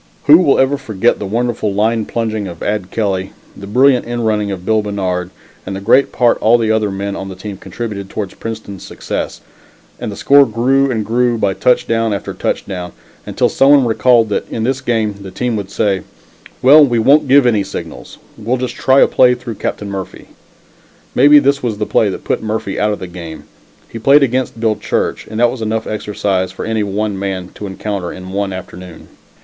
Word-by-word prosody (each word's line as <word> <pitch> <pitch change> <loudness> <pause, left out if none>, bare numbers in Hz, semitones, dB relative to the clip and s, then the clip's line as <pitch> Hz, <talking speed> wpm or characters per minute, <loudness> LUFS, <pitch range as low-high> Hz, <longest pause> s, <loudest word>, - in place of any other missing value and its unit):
Who 155 +3 +8
will 160 -7 +3
ever 135 +1 +2
forget 115 -3 0
the 100 - -4
wonderful 115 -1 -1
line 110 +1 +1
plunging 110 -3 -3
of 85 -2 -8
Ad 100 -3 -2
Kelly, 95 -4 -2 0.2
the 100 - -10
brilliant 125 +4 +3
end 120 -1 -3
running 105 -2 0
of 95 -2 -6
Bill 110 +1 +2
Bannard 95 -3 -3 0.3
and 95 - -6
the - - -4
great 115 +7 +3
part 120 -2 +2
all 115 +2 +4
the 110 -2 0
other 110 -1 +1
men 100 +1 -4
of 95 - -6
the 95 - -8
team 100 +2 -7
contributed 100 -1 -6
towards 100 -2 -5
Princeton's 110 -3 -7
success, - - -5 0.6
and - - -4
the - - -7
score 140 +4 +5
grew 130 +5 +1
and 110 -4 -2
grew 120 +1 +1
by 100 -3 0
touchdown 115 +1 +1
after - - -6
touchdown, 90 -3 -4 0.3
until - - +1
some 135 - +3
one 140 -3 +6
recalled 115 0 +3
that 105 - -2
in 110 - -3
this 130 +2 -1
game, 110 -5 -1
the 95 - -8
team 120 +5 -2
would 100 -2 -4
say, 100 -2 0 0.6
"Well, 145 +4 +8
we 120 -4 +2
won't 140 +6 +4
give 135 0 +5
any 110 -5 +2
signals; - - -8 0.2
we'll 115 +4 -1
just 125 0 -3
try 135 +1 +3
a - - +6
play 125 -1 +4
through 120 -1 -7
Captain 105 -1 -3
Murphy." 95 -2 -7 0.8
Maybe 145 +3 +6
this 140 0 +3
was 115 -4 -2
the 105 - -2
play 105 - +2
that 95 - -6
put - - -1
Murphy 110 -2 -3
out 105 0 +1
of 105 - -2
the - - -7
game. 85 -3 -9 0.4
He 115 - -8
played 140 +5 +5
against 130 -2 -1
Bill 110 -2 +1
Church, 105 - -2
and 110 +1 -5
that 120 0 +4
was 130 - -7
enough 110 0 -2
exercise 100 -3 -2
for - - -6
any 110 -1 -1
one 100 0 -2
man 95 -2 -4
to 105 - -7
encounter 95 -2 -4
in 95 0 -9
one 100 0 -2
afternoon. 90 -2 -9
110 Hz, 205 wpm, -16 LUFS, 100-120 Hz, 0.8 s, Who